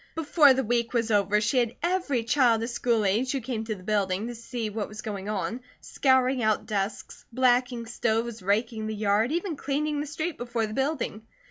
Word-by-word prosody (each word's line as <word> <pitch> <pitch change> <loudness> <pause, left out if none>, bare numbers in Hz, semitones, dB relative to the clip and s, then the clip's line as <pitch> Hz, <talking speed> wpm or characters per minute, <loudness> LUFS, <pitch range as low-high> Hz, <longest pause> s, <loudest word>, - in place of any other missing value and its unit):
Before 300 -3 +5
the 265 - 0
week 235 +1 0
was 230 -1 +1
over 205 0 +3
she 215 +5 +2
had 235 -1 0
every 345 -9 0
child 235 -3 +3
of 235 - -3
school 235 -3 +1
age 230 +8 +1
who 275 - 0
came 230 -2 -4
to 220 -1 -3
the 185 - -13
building 200 -1 0
to - - -5
see 230 -1 -5
what 210 0 -3
was 215 +1 -9
going 200 -2 -5
on, 210 +3 -3 0.2
scouring 260 -1 +2
out 215 -1 +1
desks, 200 0 -4
blacking 245 -1 +2
stoves, 230 0 -1
raking 215 +3 0
the 220 - -3
yard, 210 +3 +1
even 340 +1 -1
cleaning 290 +2 -1
the 300 - -4
street 315 +2 -4
before 240 -2 -1
the 215 - -6
building. 265 -5 -2
235 Hz, 200 wpm, -27 LUFS, 215-260 Hz, 0.2 s, Before